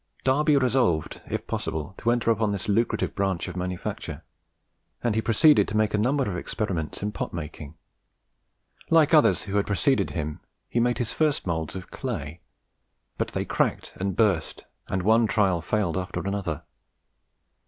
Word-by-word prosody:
Darby 145 +3 +3
resolved, 125 - +1
if - - -3
possible, 80 +4 -3
to 120 - 0
enter 120 -1 +2
upon 110 -1 +1
this 100 -2 -3
lucrative 115 +3 +1
branch 95 -3 -1
of 90 - -6
manufacture; 90 0 -4 0.8
and 120 - +2
he 110 - +1
proceeded 135 +7 +5
to 105 - -2
make 110 -1 +2
a - - +2
number 130 +4 +1
of 95 - -2
experiments 90 -2 -3
in 105 - -1
pot - - -4
making. 75 -2 -7 1.1
Like 160 -1 +5
others 155 - +5
who 100 0 -2
had 100 - +1
preceded 130 +6 +2
him, 75 -3 -4 0.3
he 120 - 0
made 120 0 +2
his 120 -1 -2
first 155 -2 +1
moulds 80 -2 -2
of 95 +2 -8
clay; 85 - -5 0.8
but - - +1
they - - -3
cracked - - -1
and 95 0 -2
burst, 100 -8 +1 0.2
and 95 -1 -1
one 110 +3 +4
trial 95 -5 +2
failed 95 +1 0
after 90 0 -3
another. 100 -6 -3
105 Hz, 165 wpm, -26 LUFS, 90-120 Hz, 1.1 s, proceeded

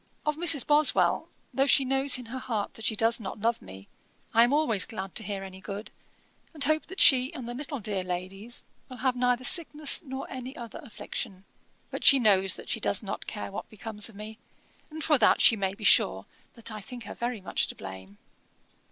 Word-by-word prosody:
'Of 300 0 0
Mrs. 320 -4 +3
Boswell, 295 0 +3 0.2
though 270 +1 +2
she 270 -1 +5
knows 270 +1 +3
in 250 - -9
her 250 +3 -7
heart 225 -5 -4
that 225 - -10
she 220 - +1
does 225 +2 +3
not 200 -1 -7
love 230 +2 -1
me, 95 +1 -13 0.5
I 230 - +6
am 240 - +2
always 245 -10 +2
glad 195 -4 -7
to 220 - -4
hear 200 -1 -5
any 190 0 -11
good, 200 +2 -7 0.6
and 295 - -1
hope 310 +2 0
that 380 +2 -9
she 260 0 +6
and 250 -3 -7
the 240 - -5
little 275 +2 -5
dear 200 -3 -3
ladies 185 +6 -5 0.2
will 255 - -10
have 255 -1 0
neither 250 0 0
sickness 305 -1 +5
nor 265 -2 -7
any 260 +1 -8
other 235 -3 -9
affliction. 200 - -7 0.5
But - - -6
she 275 - +8
knows 195 -6 +3
that - - -11
she - - -1
does - - 0
not - - -6
care 100 -1 -6
what - - -7
becomes 215 0 -3
of 220 - -17
me, 215 +2 -10 0.5
and 315 0 -7
for 300 -4 +3
that 220 - +4
she 230 - +6
may 195 -2 -3
be 215 - -12
sure 95 - +3 0.3
that 230 -1 -8
I 215 -1 -7
think 240 +4 -10
her - - -8
very 240 -1 -4
much 190 - -1
to - - -8
blame. 95 +1 -11
230 Hz, 210 wpm, -27 LUFS, 200-265 Hz, 0.6 s, she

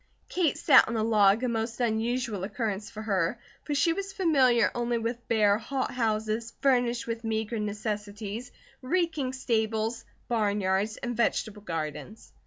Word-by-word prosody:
Kate 345 -6 +1
sat - - +6
on 230 - -2
a 215 - +1
log, 215 0 +4
a - - +2
most 225 0 -2
unusual 230 -2 -1
occurrence 210 -1 -3
for 215 0 -8
her, 195 0 0 0.3
for 295 - -2
she 330 +4 +3
was 395 +2 -4
familiar 270 - +3
only 240 0 0
with 230 +1 -4
bare, 210 -2 +3
hot 265 +3 -2
houses, 220 -1 -1
furnished 245 -3 +2
with 230 0 -4
meagre 220 0 -2
necessities; 210 +2 -4 0.3
reeking 315 -2 0
stables, 225 -3 -1 0.2
barnyards 205 -2 0
and 240 0 -4
vegetable 215 -2 0
gardens. 165 +3 -6
225 Hz, 145 wpm, -28 LUFS, 210-245 Hz, 0.3 s, sat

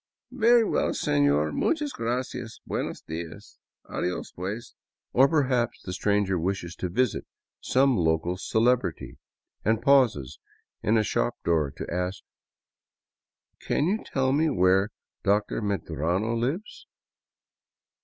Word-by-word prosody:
" - - -55
Very 235 +1 +5
well, - - +1
seiior, 75 +1 +2
muchas 300 -4 0
gracias, 120 -1 -3
buenos - - -3
dias, 80 0 -8 0.3
adios 90 0 -3
pues." 100 +6 -6 0.4
Or 135 +2 +6
perhaps 130 -7 +1
the 90 - -5
stranger 100 -2 +1
wishes 85 0 -2
to 90 - -3
visit 120 +5 0 0.3
some 135 0 +3
local 80 0 +1
celebrity 115 +6 0 0.4
and 110 +1 +2
pauses 120 - +3 0.4
in 110 +2 +2
a 110 - +3
shop - - 0
door 80 -4 +2
to - - -5
ask: 90 +2 -2 0.7
" - - -58
Can 145 - +2
you 205 +6 0
tell 130 -1 0
me 155 +3 +2
where 95 -4 +3 0.3
Dr. 105 +2 +1
Medrano 95 +1 -1
lives 140 - -3
105 Hz, 125 wpm, -26 LUFS, 90-130 Hz, 0.7 s, Or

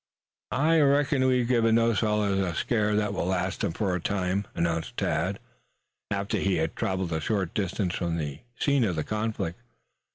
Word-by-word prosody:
"I 160 +5 +4
reckon 140 -2 +3
we've 125 -2 +2
given 115 -2 +3
those 115 -1 +3
fellows 105 -3 +1
a 90 -4 -1
scare 105 0 +1
that 105 -1 0
will 95 - -2
last 95 +1 -1
them - - 0
for 95 +1 -1
a 90 - -1
time," 95 +1 -1
announced 85 -1 -1
Tad, - - 0 0.7
after 100 +2 -1
they 95 -1 +1
had 80 0 -1
traveled 95 -3 -1
a 80 - -1
short 95 -2 -1
distance 95 -2 -1
from 85 -3 -1
the 75 -3 -4 0.2
scene 140 -3 +3
of 95 -6 0
the 80 - -1
conflict. 105 -3 -3
100 Hz, 175 wpm, -27 LUFS, 90-115 Hz, 0.7 s, I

